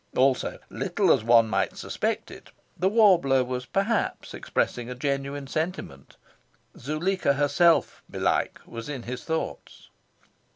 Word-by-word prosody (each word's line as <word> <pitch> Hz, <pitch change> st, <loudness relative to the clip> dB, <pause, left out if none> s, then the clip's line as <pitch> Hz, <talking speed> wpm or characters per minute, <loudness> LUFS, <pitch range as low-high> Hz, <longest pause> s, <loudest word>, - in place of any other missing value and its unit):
Also, 130 Hz, 0 st, +2 dB
little -, -, +2 dB
as -, -, 0 dB
one 115 Hz, 0 st, +5 dB
might 110 Hz, -, -1 dB
suspect -, -, -3 dB
it, -, -, -13 dB, 0.3 s
the 185 Hz, -, +1 dB
warbler 180 Hz, -, +4 dB
was 125 Hz, 0 st, -5 dB
perhaps 200 Hz, -, -1 dB
expressing 120 Hz, 0 st, -2 dB
a 125 Hz, -, -5 dB
genuine 140 Hz, +1 st, -3 dB
sentiment. 155 Hz, -, -5 dB, 0.6 s
Zuleika 155 Hz, +3 st, 0 dB
herself, 145 Hz, +3 st, +2 dB
belike, -, -, -1 dB
was 115 Hz, +3 st, -8 dB
in 135 Hz, -5 st, -5 dB
his 125 Hz, +1 st, -6 dB
thoughts. 160 Hz, 0 st, -5 dB
140 Hz, 125 wpm, -26 LUFS, 125-170 Hz, 0.6 s, one